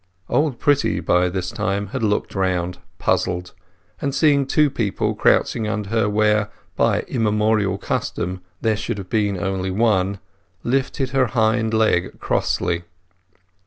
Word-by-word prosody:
Old 145 -5 +1
Pretty 145 0 +2
by 90 +1 +2
this 90 0 -3
time 100 -1 -2
had - - -4
looked 105 -2 0
round, 90 -2 -1 0.2
puzzled; 90 0 -1 0.5
and 140 -1 -1
seeing 140 -4 +3
two 150 0 +3
people 110 -7 -1
crouching 110 -3 +2
under 105 -2 -3
her 110 -2 +2
where, 105 0 +2 0.3
by - - +2
immemorial 105 -3 +1
custom, 95 -1 -3 0.2
there 110 -1 +2
should 105 +1 -3
have 95 -2 -8
been 105 -3 +1
only 95 +1 -2
one, 100 -1 +1 0.5
lifted 135 +1 -1
her 135 -2 +2
hind 110 -1 +1
leg 110 -5 +1
crossly. 90 -1 -1
105 Hz, 135 wpm, -21 LUFS, 95-115 Hz, 0.5 s, seeing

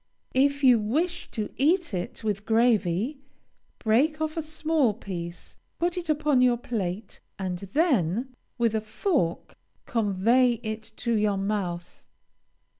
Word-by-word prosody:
If 280 +2 +2
you 250 -3 +7
wish 310 +12 -1
to 215 -3 -4
eat 335 - +2
it 180 +4 -4
with 205 -2 -1
gravy, 225 - +2 0.6
break 275 +8 +2
off 315 0 -2
a 325 - -1
small 310 -6 0
piece, 175 -5 -7 0.2
put 345 +1 0
it 350 -3 -5
upon 300 -3 +3
your 250 -1 +4
plate, 205 -4 -4 0.2
and 185 -2 -3
then, 235 - 0 0.2
with 230 -2 +2
a 220 - 0
fork, 215 - -1 0.3
convey 230 +3 +3
it 220 0 -3
to 235 -1 -1
your 210 -2 +2
mouth. 195 -4 -3
230 Hz, 130 wpm, -26 LUFS, 200-290 Hz, 0.6 s, you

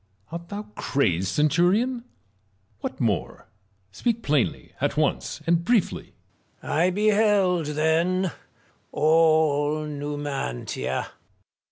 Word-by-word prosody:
Art 170 +1 -7
thou 205 +1 -5
crazed, 95 - 0
centurion 175 - +2
1 - - -18 0.8
what 130 - -5
more? 110 -7 -2 0.4
Speak 230 - -1
plainly, 145 -4 0
at - - 0
once, - - -1
and 170 0 +2
briefly, 230 -1 0 0.5
Marius. - - -2
I 180 - +4
beheld, 205 -3 +2
then, 165 +4 +1 0.6
all 155 -1 +3
Numantia. 145 - -4
160 Hz, 95 wpm, -25 LUFS, 145-185 Hz, 0.8 s, I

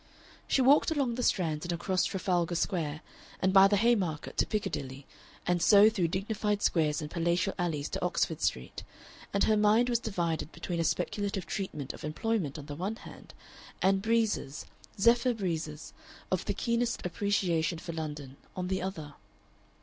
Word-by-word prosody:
She 265 - +3
walked 280 +4 +5
along 280 -6 0
the 250 - -3
Strand 160 -10 +1
and 175 - -3
across 185 +2 0
Trafalgar 180 -3 0
Square, 160 -3 -1 0.4
and 190 0 +1
by 195 0 +8
the 205 +1 +2
Haymarket 195 -9 +1
to - - +2
Piccadilly, 140 - -3 0.4
and 175 -1 +1
so 205 +3 +7
through 185 -6 +1
dignified 205 +3 -1
squares 155 -2 +1
and 150 - -7
palatial 170 +3 0
alleys 155 -5 -1
to - - -4
Oxford - - 0
Street; 60 - -2 0.5
and 200 - +2
her 220 - +4
mind 215 +4 +4
was 240 -2 +2
divided 170 -8 -2
between 170 0 -4
a - - +2
speculative 200 +2 -1
treatment 155 -6 -4
of - - -11
employment 160 0 -2
on 145 - -8
the 145 - -7
one 190 +8 -3
hand, - - -13 0.4
and 195 +1 +3
breezes 220 -10 0 0.3
zephyr 235 +3 +4
breezes 160 -6 -4 0.4
of 185 - 0
the 205 - -2
keenest 235 0 -1
appreciation 180 -3 0
for 170 +1 -7
London, 150 -4 -6 0.2
on 180 -1 -3
the 190 0 -1
other. 165 -6 -5
185 Hz, 165 wpm, -30 LUFS, 160-210 Hz, 0.5 s, by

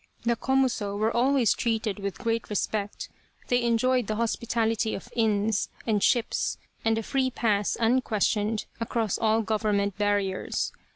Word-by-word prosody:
The 235 0 +2
Komuso 245 -6 0
were 215 +2 0
always 255 -1 +3
treated 220 -3 -1
with 200 -1 -4
great 230 -1 -2
respect, 205 0 -2 0.4
they 245 0 +3
enjoyed 240 0 +2
the 215 - -1
hospitality 225 -1 0
of 220 - -9
inns 215 -2 +1 0.2
and 215 -3 +1
ships, 235 +2 +1 0.3
and 225 0 +2
a 225 - -2
free 265 +2 0
pass 210 -5 0
unquestioned 225 -3 +1
across 230 -3 -1
all 225 0 +2
government 205 -2 0
barriers. 205 -2 0
225 Hz, 135 wpm, -27 LUFS, 205-235 Hz, 0.4 s, always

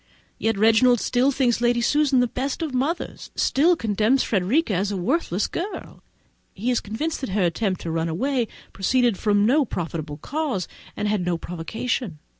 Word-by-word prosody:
Yet 225 -2 0
Reginald 225 +3 +5
still 250 +5 +2
thinks 245 -3 +1
Lady 240 0 +3
Susan 275 +1 +3
the 245 - +2
best 270 +6 -3
of 305 -5 -4
mothers, 280 +7 -2
and - - -7
still 330 +6 +3
condemns 220 +1 +1
Frederica 220 - +1
as 195 +3 0
a 200 - -2
worthless 210 - 0
girl! 390 +5 -6 0.5
He 230 +6 -1
is 245 - +2
convinced 290 +11 -3
that 265 - -3
her 195 0 +1
attempt 185 +2 0
to 165 - -4
run 165 0 -1
away 245 - 0 0.3
proceeded 240 +3 +2
from 205 +1 +2
no 285 +7 +4
justifiable 160 - -4
cause, 280 - -2 0.3
and 210 - -1
had 205 -3 0
no 175 -1 0
provocation. 180 - -4
225 Hz, 175 wpm, -23 LUFS, 190-265 Hz, 0.5 s, Reginald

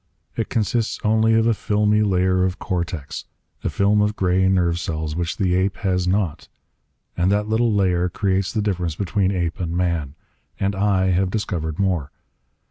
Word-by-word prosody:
It - - -2
consists 115 0 0
only 110 +1 +3
of 115 0 +3
a 115 - +4
filmy 105 0 +1
layer 95 -2 +2
of 95 +1 -1
cortex, 85 -6 -4 0.4
a - - 0
film 105 +1 +2
of 105 +1 +1
gray 95 0 +2
nerve 85 -3 +2
cells 80 -3 -3
which 85 0 -2
the 90 -2 +1
ape 95 +2 +1
has 90 -3 0
not. 90 -4 -1 0.7
And 90 +2 +1
that 105 +1 +1
little 115 +1 +2
layer 90 -3 +2
creates 95 +1 0
the 110 -2 -1
difference 90 -6 -1
between 95 +1 0
ape 85 -3 -2
and 85 -1 -2
man. 85 -6 -1 0.4
And 100 0 0
I 95 -2 +2
have 95 +1 +1
discovered 85 -7 -3
more. 90 -8 0
95 Hz, 170 wpm, -22 LUFS, 90-105 Hz, 0.7 s, a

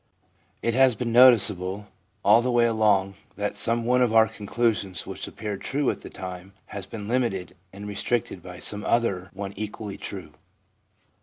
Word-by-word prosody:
It 115 - 0
has 130 -1 +4
been 115 +2 -3
noticeable 105 -6 +5 0.4
all 105 +4 +6
the 125 - -2
way 120 -1 +3
along 105 -4 +2 0.2
that 105 0 -3
some 115 0 +2
one 125 +1 +2
of 125 -3 +2
our 110 0 +6
conclusions 105 -4 -2
which - - -6
appeared 105 -2 -6
true 140 0 0
at - - -9
the - - -8
time 90 +1 -9 0.2
has 100 -2 -6
been 105 0 -8
limited 110 -7 -2 0.2
and 100 +2 -9
restricted 105 +4 -2
by - - -10
some 105 0 -1
other 100 -6 0
one 100 -1 -6
equally 105 0 -6
true. - - -8
105 Hz, 165 wpm, -25 LUFS, 100-120 Hz, 0.4 s, all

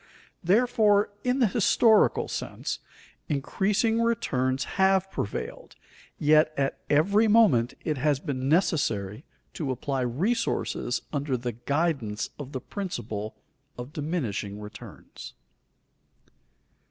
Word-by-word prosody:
Therefore, 210 +1 +3
in 250 +1 +1
the 255 - +4
historical 220 +1 +3
sense, - - -4 0.5
increasing 200 - +1
returns 135 - 0
have 190 0 +2
prevailed, 100 - -5 0.4
yet 155 +1 +4
at 135 -1 -1
every 200 +9 +4
moment 205 - +4
it 150 -4 -1
has 145 0 +2
been 135 -3 -3
necessary 135 - 0 0.3
to 150 -5 -4
apply 130 +1 -2
resources 135 - -1
under 140 -2 -1
the 120 0 -3
guidance 120 -3 -2
of 140 -2 -7
the 130 - -4
principle 110 - -5 0.4
of 125 +4 -8
diminishing 130 - -3
returns. 105 0 -11
150 Hz, 105 wpm, -27 LUFS, 125-200 Hz, 0.5 s, the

